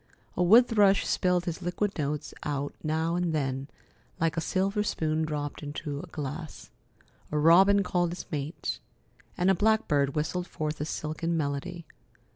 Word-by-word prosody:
A - - 0
wood 225 +8 +7
thrush 205 -4 +4
spilled 180 -1 +1
his 170 0 -4
liquid 185 +3 -1
notes 150 +1 -2
out 145 -1 -3
now 160 +2 0
and 175 -2 0
then, 135 -2 -2 0.5
like 165 0 +1
a 165 - 0
silver 195 +5 0
spoon 160 -6 0
dropped 145 -2 -4
into 145 -1 -5
a 180 - -8
glass. 150 0 -7 0.6
A 150 - 0
robin 190 +6 +6
called 175 -2 +1
his 175 - -6
mate, 150 +1 -3 0.6
and 185 +1 +3
a - - +5
blackbird 175 -9 +2
whistled 175 +4 -1
forth 155 -1 -4
a - - -1
silken 160 +2 -2
melody. 160 +4 -3
165 Hz, 155 wpm, -28 LUFS, 150-180 Hz, 0.6 s, wood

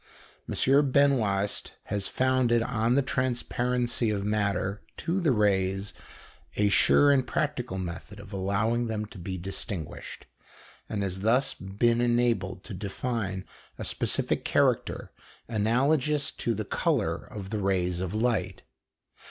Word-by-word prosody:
M. 140 +1 +3
Benoist 110 -8 +2
has 100 -1 -2
founded 130 -3 +2
on 115 +1 +1
the 140 - +3
transparency 125 -2 0
of 100 -2 -1
matter 105 -1 0 0.2
to 180 +3 -1
the 165 - +2
rays 100 -3 +1 0.6
a 105 0 +3
sure 145 +7 +5
and 135 -2 +2
practical 130 - -2
method 95 +3 -6
of 100 -1 -11
allowing 105 +5 0
them 110 -1 -2
to 105 -2 -12
be 95 +2 -4
distinguished, 90 -2 -5 0.6
and 100 -2 -2
has 95 -1 -3
thus 115 +7 +2
been 115 +5 +1
enabled 120 -6 +1
to 110 - -8
define 100 0 -3 0.3
a - - -4
specific - - 0
character - - +1 0.4
analogous 135 +7 +1
to 115 - -2
the 110 +1 -3
colour - - 0
of 100 -2 -9
the 110 - -1
rays 90 -3 0
of 95 +2 -3
light. 115 +1 0
110 Hz, 130 wpm, -28 LUFS, 95-125 Hz, 0.6 s, sure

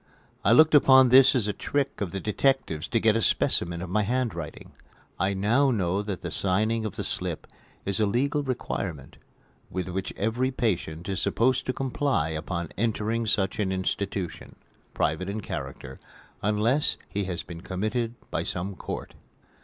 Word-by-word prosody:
I - - +4
looked 155 0 +7
upon 130 -3 +7
this 130 +2 +7
as 115 -5 +1
a 105 - 0
trick 140 +1 -2
of 100 - -1
the 95 - -4
detectives 105 - 0
to 115 - +1
get 110 0 +3
a 115 - +2
specimen 85 -4 +1
of 90 - -6
my 105 +2 +2
handwriting. 105 -8 -3 0.5
I 95 +1 +1
now 115 +9 +3
know 100 -5 +1
that 100 -3 -5
the - - -5
signing 110 +4 0
of 105 - -4
the - - -3
slip - - -3 0.4
is 100 +2 +1
a 105 - +3
legal 140 +8 +1
requirement, 100 - -4 0.5
with 95 0 -3
which 95 +1 -3
every 115 +5 0
patient 90 -9 -2
is 95 0 -2
supposed 130 +2 +1
to - - +2
comply 130 - 0
upon 85 +1 -3
entering 115 0 0
such 100 0 0
an 100 -3 +1
institution 95 -2 -3 0.4
private 80 +5 0
in 105 +2 -3
character 65 -8 -6 0.4
unless 110 +8 +2
he 100 -1 -2
has 90 -2 -4
been 85 -3 -9
committed 110 +6 -2 0.2
by - - -1
some 95 +3 -3
court. - - -6
105 Hz, 165 wpm, -27 LUFS, 95-120 Hz, 0.5 s, looked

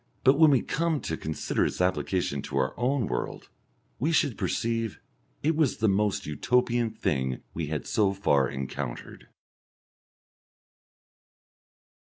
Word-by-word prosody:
But 135 +3 +5
when 160 -1 +8
we 135 -4 +3
come 165 -1 0
to 80 - -3
consider 80 0 -1
its - - -2
application 90 -5 0
to 70 - -4
our 65 0 +1
own 125 0 +1
world - - -4 0.5
we 150 +6 +1
should 145 -7 +2
perceive 115 -2 -1 0.4
it 160 +2 +2
was 155 -5 +2
the 110 0 +2
most 100 0 +1
Utopian 120 - +1
thing 65 - -2
we 80 -2 -3
had 75 0 -3
so 105 -4 +2
far 70 -9 +2
encountered. 65 -1 -6
105 Hz, 130 wpm, -27 LUFS, -, 0.5 s, when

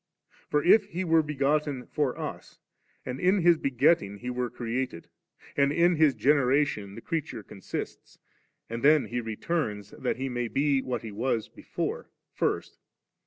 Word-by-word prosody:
For, 150 0 +2
if 205 +3 +6
He 180 +1 -4
were 165 -2 +4
begotten 145 -2 0
for 145 -5 -1
us, - - -7 0.5
and 125 +1 -4
in 185 0 +3
His 170 -2 +5
begetting 120 -6 +2
we 125 - -2
were 125 0 -2
created, 120 -4 -4 0.5
and 140 0 +3
in 170 +3 +3
His 155 -3 +4
generation 135 -7 +2
the 115 - -8
creature 145 -9 -4
consists, 95 -1 -7 0.5
and 115 +1 -5
then 150 +1 +5
He 120 0 -3
returns 110 - -3
that - - -3
He 135 +1 -2
may 120 -2 -2
be 140 +4 +1
what 130 -2 -3
He 110 - -6
was 115 +1 -1
before, - - -5 0.2
first. - - -2
135 Hz, 155 wpm, -28 LUFS, 120-150 Hz, 0.5 s, if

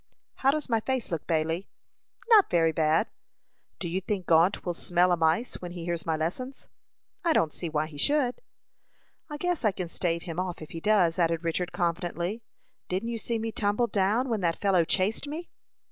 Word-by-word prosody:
"How 270 - +3
does 300 +1 0
my 230 -3 +2
face 255 -2 -2
look, 165 -3 -3
Bailey?" 165 +3 0 0.6
"Not 430 -4 +7
very 165 -2 +3
bad." 160 +5 +2 0.7
"Do 180 - -4
you 180 +3 -1
think 190 -1 -3
Gault 165 +4 +3
will 175 - -1
smell 175 +1 +2
a - - +5
mice 165 +8 +1
when 175 -1 -6
he 175 -2 -6
hears 170 -2 -3
my 160 - +2
lessons?" 250 - -4 0.5
"I 335 -2 +3
don't 160 - +2
see 170 - -4
why 155 0 0
he 150 -2 -10
should." 275 - +1 0.9
"I 295 - -5
guess 355 -1 -1
I 215 - +4
can 180 -2 -5
stave 170 -1 -1
him 170 -1 -5
off 185 -1 -3
if 155 - -10
he 165 - -5
does," 185 -3 +3
added 165 -1 +1
Richard, 170 +2 -1
confidently. 175 +3 -2 0.5
"Didn't 190 +6 -1
you 230 -1 -3
see 230 +1 -1
me 225 0 -3
tumble 210 +2 +1
down 215 +4 +1
when 225 -4 -1
that 170 -2 +1
fellow 190 -4 +3
chased 200 - 0
me?" 320 +4 -6
180 Hz, 195 wpm, -28 LUFS, 165-225 Hz, 0.9 s, Not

